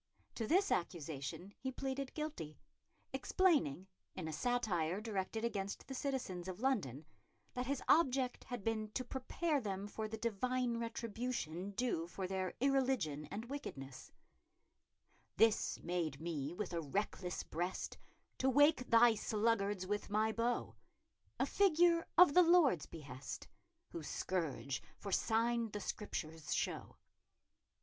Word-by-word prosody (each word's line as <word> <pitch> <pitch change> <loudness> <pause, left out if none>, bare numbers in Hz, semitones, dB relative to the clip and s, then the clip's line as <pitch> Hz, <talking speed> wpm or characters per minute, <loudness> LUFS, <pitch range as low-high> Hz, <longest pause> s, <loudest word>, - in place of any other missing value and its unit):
To 225 - -3
this 380 - +3
accusation 170 +2 -3
he 260 - -3
pleaded 270 +1 -3
guilty, 300 - -4 0.6
explaining, 285 - +2 0.3
in 160 - -4
a 160 - -4
satire 190 -4 0
directed 215 +1 -2
against 200 -3 -3
the 270 - -6
citizens 255 -10 -3
of 185 0 -5
London, 185 - 0 0.5
that 250 0 -2
his 280 -1 -1
object 265 -5 +3
had 245 -5 -5
been 215 -1 -1
to 255 - -2
prepare 285 +4 -1
them 195 -2 -3
for 215 +1 -4
the 220 +1 -5
divine 235 +2 0
retribution 230 -6 -3
due 195 -7 0
for 185 +2 -4
their 185 0 -2
irreligion 255 - +1
and 220 +3 -5
wickedness: 135 - -7 1.3
This 225 0 +3
made 170 -5 -1
me 155 -3 -3
with 180 0 -4
a 170 - 0
reckless 180 +3 -2
brest, 175 +4 -3 0.4
To 265 - +3
wake 290 -1 +5
thy 230 0 +7
sluggards 210 -3 +1
with 205 +2 -2
my 215 +2 +2
bowe; 235 +2 0 0.7
A - - +3
figure 345 -3 +4
of 355 -4 +9
the 360 - +8
Lord's 330 - +5
behest, 140 -4 -7 0.4
Whose 160 -3 -6
scourge 160 -7 -2 0.2
for 200 - -6
synne 230 +2 +2
the 210 - -3
Scriptures 160 -6 -3
shew. - - -2
215 Hz, 130 wpm, -37 LUFS, 175-255 Hz, 1.3 s, of